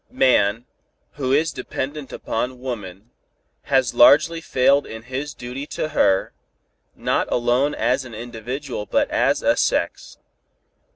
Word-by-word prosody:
Man, 120 - +2 0.5
who 130 -3 -3
is 155 +4 +2
so - - -16
dependent 135 +2 -5
upon 125 +2 -3
woman, 110 -4 -7 0.5
has 130 -4 +2
largely 150 +7 +5
failed 140 -1 +2
in 110 0 -8
his 130 +3 -5
duty 125 +4 -7
to 155 - -1
her, 95 -10 +2 0.6
not - - -1
alone 125 +4 +1
as 130 +3 0
an 120 -3 -10
individual 120 +1 -6
but - - +1
as - - +1
a - - +3
sex. - - -1
130 Hz, 130 wpm, -22 LUFS, 120-140 Hz, 0.6 s, largely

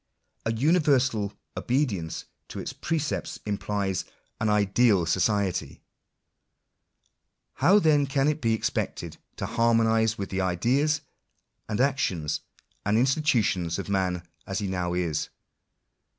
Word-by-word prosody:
A - - +2
universal 130 - +2 0.2
obedienoe 120 - -1 0.2
to - - -7
its - - -5
precepts 155 -2 -2
implies 100 -2 -1 0.4
an 110 - +1
ideal 105 -2 +3
society. 95 +2 0 1.8
How 195 +3 +5
then 150 -7 +4
can 135 +1 +1
it 150 0 0
be 115 -1 +2
expected - - -3 0.2
to - - -4
harmonise 115 -1 +2
with 100 - -5
the 95 0 0
ideas, 130 - +1 0.7
and 105 - -2
actions, 120 - 0 0.4
and 105 +2 +2
institu 130 0 +3
tions 85 -4 -1
of 100 - -5
man 90 -3 -1 0.2
as 95 - -2
he 105 - -2
now 90 -2 -2
is 85 -4 -1
110 Hz, 120 wpm, -27 LUFS, 95-135 Hz, 1.8 s, How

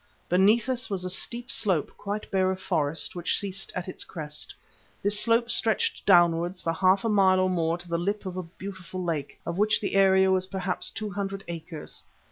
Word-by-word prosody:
Beneath 205 +6 +4
us 255 -2 -1
was 190 -3 -2
a 185 - -1
steep 240 +6 +1
slope 195 -9 +2
quite 205 +1 -5
bare 190 -1 +2
of 190 0 -2
forest, 160 -4 -1
which 175 -1 0
ceased 195 -1 -2
at 180 0 -4
its 185 - -3
crest. 150 -2 -4 0.5
This 205 +1 +2
slope 235 +1 +3
stretched 220 -1 +1
downwards 175 -1 +4
for 165 - -1
half 190 +5 +3
a - - +2
mile 195 -3 +4
or 185 0 +2
more 165 -1 0
to 175 0 -14
the 170 0 -1
lip 205 +4 -2
of 185 -1 -5
a 185 - -2
beautiful 185 +1 -8
lake, 155 -5 -3
of 170 +2 -3
which 215 +1 +3
the 200 - -3
area 190 -1 +5
was 185 0 +1
perhaps 190 -1 -3
two 215 -1 -5
hundred 195 -1 -4
acres. 165 -2 -6
185 Hz, 200 wpm, -27 LUFS, 175-200 Hz, 0.5 s, area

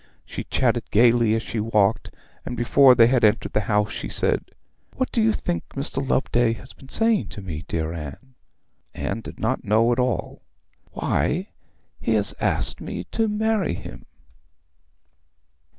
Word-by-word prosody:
She - - -6
chatted 120 -2 0
gaily 115 0 +4
as 115 - -2
she 115 - -4
walked, 105 -1 +1 0.3
and 125 - -5
before 130 +2 +6
they 115 -1 +7
had 125 0 +2
entered 110 +1 +2
the - - +3
house 105 0 +2
she - - -5
said, - - 0 0.5
'What 260 - -1
do 230 - +1
you 220 0 +4
think 175 -4 -2
Mr 140 0 -4
Loveday 120 -3 +1
has 130 +3 -12
been 135 - -16
saying 225 +2 +2
to 105 - -9
me, 80 -4 -6
dear 80 0 -2
Anne?' 80 - -8 0.6
Anne 105 +3 -3
did - - -10
not 120 +4 -1
know 110 +2 +3
at 120 - +1
all. 125 -1 -1 0.5
'Why, 185 +7 -1 0.5
he - - 0
has - - +1
asked - - 0
me - - -5
to 225 -1 +1
marry 215 - 0
him.' - - -10
120 Hz, 160 wpm, -23 LUFS, 110-140 Hz, 0.6 s, they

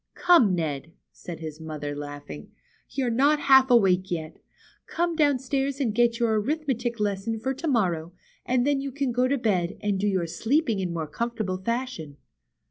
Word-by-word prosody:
Come, 330 - +5
Ned," 160 -1 -3 0.2
said 170 -2 -9
his 155 0 -7
mother, 150 -2 -5
laughing; 145 - -8 0.4
you're 255 -3 -1
not 285 +5 +3
half 265 -1 +6
awake 190 -6 +4
yet. 160 -2 -4 0.5
Come 340 0 -1
downstairs 275 -2 +1
and 240 -6 0
get 235 +1 +2
your 225 -3 +1
arithmetic 245 -3 -2
lesson 205 +2 -1
for 265 +4 -2
to 320 +5 -5
morrow, 175 - 0 0.3
and 250 0 +1
then 285 -1 +1
you 275 0 -4
can 275 -1 -1
go 250 +2 +2
to 280 +2 +1
bed, 195 -6 0
and 205 -2 -1
do 205 - 0
your 190 -4 +1
sleeping 225 - 0
in 180 -2 -2
more 165 -2 -3
comfortable 215 +3 -3
fashion." 230 - -4
225 Hz, 170 wpm, -26 LUFS, 175-265 Hz, 0.5 s, half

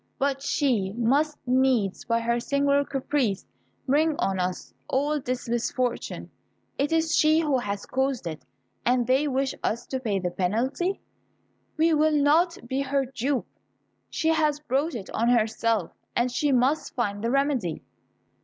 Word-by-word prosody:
But 275 0 0
she 240 -10 0
must 285 +6 +2
needs, 250 -6 +2
by 230 0 +1
her 235 +1 0
singular 280 +3 +2
caprice, 265 -7 -1 0.4
bring 300 +3 +2
on 190 -1 0
us 180 0 -3
all 295 +3 0
this 255 0 -3
misfortune. 240 +1 -2 0.5
It 280 +2 +1
is 325 0 +2
she 310 +1 +4
who 290 -5 +1
has 200 -3 -4
caused 265 -4 -1
it, 160 -2 -5 0.4
and 245 0 +2
they 265 +5 +2
wish 270 -1 0
us 230 - -1
to 260 - -3
pay 215 -6 -1
the 180 -2 -2
penalty. 250 - -1 0.8
We 325 +1 +3
will 310 0 +3
not 320 +5 +3
be 265 +2 -1
her 275 0 0
dupe. 260 +1 -2 0.6
She 320 - 0
has 305 -2 +2
brought 295 +2 -1
it 200 -5 -7
on 235 +2 +1
herself, 225 -4 +1 0.2
and 245 +1 +1
she 285 +4 +1
must 265 +4 +1
find 205 -4 -2
the 230 - +1
remedy." 270 - 0
260 Hz, 155 wpm, -26 LUFS, 230-290 Hz, 0.8 s, she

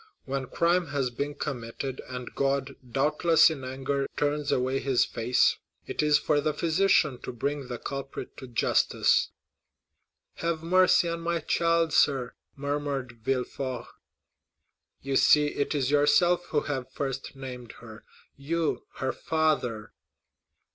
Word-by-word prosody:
When 135 -1 -3
crime 170 +3 +1
has 135 -3 -1
been 145 +4 -4
committed, 130 -1 -5
and 125 -1 -7
God, 135 0 -1 0.2
doubtless 155 +5 +4
in 140 -4 -6
anger, 135 +2 -2
turns 145 0 0
away 130 +1 +1
his 135 -3 +2
face, 120 +2 +2 0.3
it - - -2
is 150 -1 +4
for 150 -1 +1
the 150 0 -1
physician 160 -5 +2
to - - -5
bring 140 +3 -3
the 120 -1 -5
culprit 135 +2 -6
to 130 - -9
justice." 120 - +2 1.1
40122m - - -7
"Have 165 -1 -1
mercy 180 0 +4
on 170 0 -3
my 170 0 -1
child, 165 +1 +1
sir," 130 -4 +2 0.2
murmured 140 -4 -3
Villefort. 130 0 -2 1.2
"You 135 0 -2
see 150 +2 +5
it 145 +1 -2
is 135 -2 0
yourself 175 +5 +3
who 150 - +1
have 135 -4 -4
first 135 -1 -4
named 125 -3 -8
her—you, 140 +7 -5
her 130 0 -1
father." 150 -9 -1
140 Hz, 135 wpm, -27 LUFS, 130-155 Hz, 1.2 s, see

